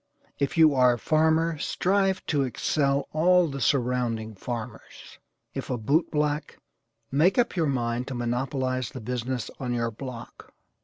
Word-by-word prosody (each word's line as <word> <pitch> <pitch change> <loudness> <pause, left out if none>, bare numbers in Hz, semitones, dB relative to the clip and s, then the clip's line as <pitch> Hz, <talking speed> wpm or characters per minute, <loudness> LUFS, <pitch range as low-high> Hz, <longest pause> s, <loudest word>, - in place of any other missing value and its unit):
If 145 +5 -1
you 160 -2 +6
are 125 -2 +5
a - - -3
farmer 160 +3 +2
strive 190 +3 0
to 145 -3 +1
excel 140 +2 0
all 180 +2 +4
the 140 -2 -5
surrounding 120 -4 0
farmers. 115 +3 -8 0.3
If - - -5
a 125 - -1
boot 140 +10 +1
black, 150 0 -1 0.5
make 155 +8 +3
up 245 -4 +2
your 165 -4 +1
mind 120 -1 -1
to 135 - -5
monopolize 130 +1 -1
the 130 - -8
business 125 +1 -3
on 125 -3 -2
your 115 -1 -1
block. 120 +1 -9
135 Hz, 150 wpm, -26 LUFS, 120-155 Hz, 0.5 s, you